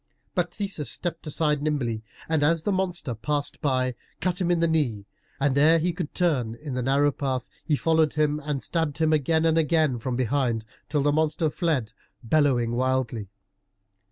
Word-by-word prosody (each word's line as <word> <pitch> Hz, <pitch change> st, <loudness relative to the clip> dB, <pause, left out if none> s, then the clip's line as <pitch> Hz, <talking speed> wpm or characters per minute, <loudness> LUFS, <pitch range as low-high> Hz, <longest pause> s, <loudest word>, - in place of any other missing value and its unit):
But 180 Hz, -2 st, 0 dB
Theseus 195 Hz, -8 st, -3 dB
stepped 170 Hz, -2 st, -3 dB
aside 150 Hz, -1 st, +1 dB
nimbly, 135 Hz, -7 st, -1 dB, 0.3 s
and 160 Hz, -2 st, +1 dB
as 160 Hz, +2 st, +2 dB
the 205 Hz, -, 0 dB
monster 180 Hz, -8 st, -1 dB
passed 145 Hz, +6 st, -3 dB
by, 130 Hz, -3 st, +1 dB, 0.3 s
cut 185 Hz, +1 st, -1 dB
him 175 Hz, -, +1 dB
in 175 Hz, -1 st, +3 dB
the 170 Hz, -, +3 dB
knee, 130 Hz, -11 st, 0 dB, 0.3 s
and 140 Hz, -1 st, +2 dB
ere 155 Hz, +4 st, +6 dB
he 170 Hz, +2 st, 0 dB
could 150 Hz, -, -5 dB
turn 135 Hz, -11 st, +1 dB
in 145 Hz, +2 st, -7 dB
the 125 Hz, -, -1 dB
narrow 140 Hz, +3 st, +3 dB
path, 130 Hz, -2 st, -2 dB, 0.2 s
he 150 Hz, -, +1 dB
followed 160 Hz, 0 st, +2 dB
him, 150 Hz, -1 st, +1 dB
and 145 Hz, -2 st, -2 dB
stabbed 160 Hz, -4 st, -1 dB
him 160 Hz, 0 st, +2 dB
again 160 Hz, +2 st, +2 dB
and 165 Hz, 0 st, +4 dB
again 155 Hz, -5 st, +2 dB
from 125 Hz, +2 st, -3 dB
behind, 120 Hz, -2 st, 0 dB, 0.2 s
till 145 Hz, -2 st, +1 dB
the 145 Hz, -, +3 dB
monster 155 Hz, 0 st, +1 dB
fled, 150 Hz, -, -1 dB, 0.3 s
bellowing 125 Hz, -3 st, +2 dB
wildly. 125 Hz, -4 st, -1 dB
150 Hz, 180 wpm, -26 LUFS, 130-160 Hz, 0.3 s, ere